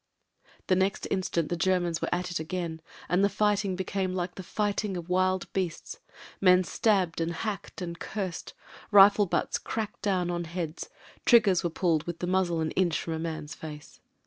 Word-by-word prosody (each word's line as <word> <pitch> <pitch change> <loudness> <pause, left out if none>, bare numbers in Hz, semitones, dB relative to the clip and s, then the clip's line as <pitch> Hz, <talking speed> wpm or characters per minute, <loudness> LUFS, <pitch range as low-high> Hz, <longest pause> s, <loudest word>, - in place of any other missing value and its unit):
The 185 - +3
next 190 +1 0
instant 180 -4 0
the 175 - 0
Germans 175 -2 +1
were - - -1
at 180 0 -1
it 175 - -2
again, 165 0 -4 0.3
and 180 +3 +2
the 200 - +4
fighting 205 -1 +1
became 185 0 -2
like 180 -1 -2
the - - -7
fighting 205 0 -1
of 170 0 -7
wild 185 0 +1
beasts. 180 -4 -3 0.4
Men 185 -1 +6
stabbed 185 -3 +1
and 165 +1 0
hacked 200 +1 -5
and 170 -1 -6
cursed; 190 -5 -5 0.3
rifle 205 0 +7
butts - - 0
cracked 220 -2 -4
down 185 -3 0
on 175 0 -2
heads; 165 -1 -5 0.3
triggers 205 -7 +5
were 170 - +1
pulled 165 -2 0
with 170 -1 -4
the 175 - -3
muzzle 180 -2 +1
an 155 - -1
inch 175 -4 +1
from 165 - -4
a 160 - -3
man's 160 -2 -4
face. 150 -3 -10
180 Hz, 180 wpm, -28 LUFS, 170-195 Hz, 0.4 s, rifle